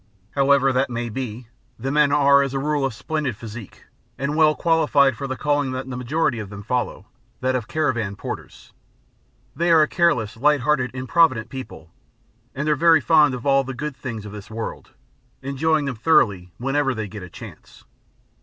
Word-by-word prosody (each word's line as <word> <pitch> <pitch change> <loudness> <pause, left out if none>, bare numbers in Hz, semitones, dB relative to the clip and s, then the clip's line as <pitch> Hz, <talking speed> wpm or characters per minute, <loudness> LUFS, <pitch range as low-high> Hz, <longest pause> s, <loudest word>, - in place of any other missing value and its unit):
However 135 -1 +3
that 130 +2 +1
may 120 0 -3
be, 120 0 -6 0.3
the 135 +4 -3
men 150 -1 +3
are 140 -1 +5
as 140 -1 -2
a - - 0
rule 145 0 0
of 135 - -2
splendid 145 -5 -3
physique 110 -2 -10 0.3
and 140 +2 -2
well 155 -1 +4
qualified 150 -5 +3
for 140 +4 -5
the 130 -1 -4
calling 145 -3 0
that 130 +1 -5
the 130 - -5
majority 125 0 -1
of 105 -3 -6
them 100 0 -9
follow, 125 +3 -2 0.4
that 130 0 +1
of 120 -3 -2
caravan 120 -10 -1
porters. - - -8 0.8
They 170 +4 0
are 160 -2 +6
a - - +1
careless, 125 -13 +1
light 145 +2 +3
hearted, 135 -2 +1
improvident 130 -3 +2
people, 115 - -9 0.6
and 140 +3 -3
are 150 - +3
very 165 +1 +5
fond 150 -4 +4
of 120 - -9
all 135 -1 +4
the 135 0 -6
good 145 +2 -5
things 115 -6 -6
of 105 - -8
this 105 -1 -10
world, 110 0 -6 0.5
enjoying 150 +3 0
them 135 -4 -4
thoroughly 100 - +2
whenever 135 +1 0
they 110 -1 -4
get 105 +2 -8
the 90 -2 -9
chance. - - -13
135 Hz, 185 wpm, -22 LUFS, 120-150 Hz, 0.8 s, are